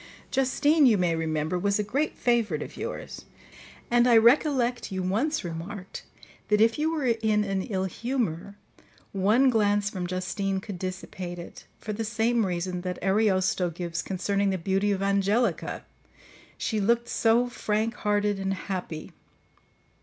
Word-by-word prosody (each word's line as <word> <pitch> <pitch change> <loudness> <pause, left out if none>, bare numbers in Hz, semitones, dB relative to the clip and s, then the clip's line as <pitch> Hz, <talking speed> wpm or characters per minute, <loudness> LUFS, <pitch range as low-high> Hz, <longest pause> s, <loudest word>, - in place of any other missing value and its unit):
"Justine, 280 +3 +3
you 220 -4 +5
may 175 -3 +1
remember, 160 +1 -1
was 200 +2 +1
a 210 - 0
great 275 +9 -1
favourite 225 -11 +1
of - - -10
yours; - - -6 0.7
and 240 0 +4
I 235 -2 +6
recollect 245 -1 +3
you 190 -1 -2
once 235 +12 0
remarked 180 +3 -7 0.4
that 210 0 +3
if 225 +5 +3
you 315 +1 +1
were 310 -4 -2
in 220 -3 +2
an 195 -2 -1
ill 190 -1 -2
humour, 200 -3 -3 0.6
one 215 +7 +3
glance 205 -2 +2
from 180 -2 -4
Justine 190 +2 -2
could 190 -2 -8
dissipate 185 -1 -5
it, 170 - -10
for 215 - -5
the 225 +2 -3
same 225 0 +1
reason 180 0 -3
that 180 0 -4
Ariosto 190 -2 +2
gives 170 0 -4
concerning 200 +1 -1
the 190 - 0
beauty 195 +3 0
of 195 -1 -1
Angelica—she 200 +2 -2
looked 235 +3 +2
so 235 +2 +2
frank 220 -1 -1
hearted 205 -1 0
and 195 0 -1
happy. 180 -5 -5
205 Hz, 145 wpm, -27 LUFS, 185-230 Hz, 0.7 s, I